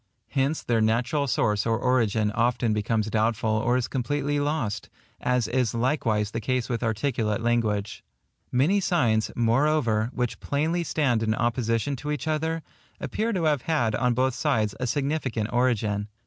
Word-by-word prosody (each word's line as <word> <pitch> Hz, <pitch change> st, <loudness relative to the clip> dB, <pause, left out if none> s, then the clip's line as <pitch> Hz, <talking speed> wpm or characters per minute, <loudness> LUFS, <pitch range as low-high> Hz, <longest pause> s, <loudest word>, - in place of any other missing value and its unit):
Hence 140 Hz, +3 st, 0 dB
their 115 Hz, -2 st, +1 dB
natural 125 Hz, +7 st, +1 dB
source 105 Hz, -3 st, +1 dB
or 115 Hz, 0 st, +2 dB
origin 115 Hz, -4 st, +1 dB
often 115 Hz, 0 st, +1 dB
becomes 105 Hz, +1 st, 0 dB
doubtful 110 Hz, +1 st, +1 dB
or 115 Hz, +3 st, +2 dB
is 125 Hz, -, -1 dB
completely 145 Hz, +2 st, -1 dB
lost; 145 Hz, -8 st, -2 dB, 0.3 s
as 125 Hz, -2 st, +1 dB
is 120 Hz, -2 st, 0 dB
likewise 115 Hz, -5 st, 0 dB
the 115 Hz, -, -3 dB
case 125 Hz, 0 st, -1 dB
with 120 Hz, -2 st, -2 dB
articulate 115 Hz, -2 st, 0 dB
language. 110 Hz, -4 st, 0 dB, 0.5 s
Many 150 Hz, +11 st, +3 dB
signs, 120 Hz, -, +1 dB
moreover, 120 Hz, -2 st, +2 dB
which 125 Hz, -3 st, -2 dB
plainly 160 Hz, +5 st, 0 dB
stand 135 Hz, -9 st, +1 dB
in 110 Hz, -1 st, +1 dB
opposition 115 Hz, +2 st, 0 dB
to 150 Hz, -, -6 dB
each 150 Hz, +1 st, -3 dB
other, 160 Hz, +1 st, -1 dB, 0.4 s
appear 225 Hz, +2 st, -2 dB
to 185 Hz, -6 st, -1 dB
have 150 Hz, -4 st, +2 dB
had 120 Hz, -9 st, 0 dB
on 125 Hz, +1 st, +1 dB
both 130 Hz, +1 st, +1 dB
sides 110 Hz, -4 st, 0 dB
a 125 Hz, -, -1 dB
significant 130 Hz, -4 st, -1 dB
origin. 110 Hz, -5 st, +1 dB
120 Hz, 155 wpm, -26 LUFS, 110-145 Hz, 0.5 s, Many